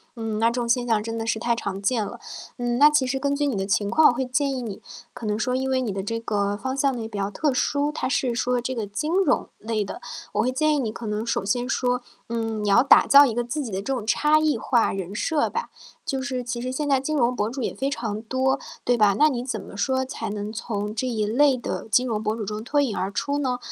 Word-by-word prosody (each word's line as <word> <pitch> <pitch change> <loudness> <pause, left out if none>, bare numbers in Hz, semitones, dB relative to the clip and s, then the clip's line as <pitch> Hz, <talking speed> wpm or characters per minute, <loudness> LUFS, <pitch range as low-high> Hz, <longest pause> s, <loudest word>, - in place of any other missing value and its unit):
嗯， 225 -2 -3
那 225 - +4
这 - - -4
种 240 -1 -2
现 245 +1 +2
象 220 -2 +2
真 225 +1 -4
的 225 - -3
是 225 -1 0
太 235 0 +1
常 200 -4 -4
见 220 +1 +1
了。 - - -8 0.4
嗯， 240 0 -1
那 295 +3 +8
其 295 -3 +2
实 270 +1 -1
根 280 +1 0
据 290 +1 0
你 270 - -1
的 195 -1 -1
情 205 0 +1
况， 310 +7 +6
我 - - +1
会 260 +2 -2
建 275 +3 0
议 260 -2 -3
你 215 -5 -6 0.3
可 230 - -8
能 210 0 0
说 250 +2 0
因 265 0 -1
为 260 -1 +1
你 230 -5 -2
的 195 - -3
这 230 +3 -2
个 205 -2 -1
方 260 +5 -4
向 275 -2 +2
呢， 235 - -4
也 220 - -4
比 215 -2 -7
较 200 0 -1
特 290 +6 0
殊， 285 +3 +1
它 - - -2
是 255 -1 0
说 250 +1 0
这 255 +2 -3
个 225 -3 -2
金 285 +11 -3
融 - - +1
类 220 -1 -2
的， 195 - -7 0.3
我 210 - +2
会 250 - +1
建 305 +3 +2
议 - - 0
你 225 -5 -1
可 225 - -7
能 210 +1 -2
首 230 - -1
先 245 +5 0
说， 250 -1 0 0.3
嗯， 225 -2 -2
你 205 - 0
要 200 - +6
打 275 - +6
造 285 +1 +9
一 245 - 0
个 240 +2 0
自 280 +5 -3
己 230 - -6
的 190 0 -2
这 270 +7 -2
种 240 -5 -3
差 300 +7 +3
异 310 -4 +2
化 235 +1 +2
人 190 0 -5
设 305 +6 +1
吧。 470 - -4 0.4
就 270 -1 -2
是 260 -2 -3
其 240 0 -4
实 250 +1 -3
现 290 +3 -2
在 275 -2 +3
金 305 +4 -2
融 250 -3 +2
博 215 -3 -1
主 260 +3 -5
也 - - -2
非 270 +1 -2
常 220 -6 -3
多， 260 +3 0 0.2
对 245 0 +2
吧？ 205 -3 +4
那 305 +1 +5
你 245 -4 -2
怎 255 - -3
么 200 - -11
说 260 +4 +1
才 260 - -5
能 205 0 -4
从 210 -2 -4
这 225 +4 -2
一 220 -4 -1
类 265 +5 +4
的 240 - -5
金 250 +3 +3
融 220 -3 -1
博 215 0 -1
主 225 - -4
中 210 +1 -4
脱 285 +6 +1
颖 245 -7 -1
而 190 - -1
出 285 +8 -2
呢？ 260 -3 0
240 Hz, 305 characters per minute, -24 LUFS, 215-265 Hz, 0.4 s, 造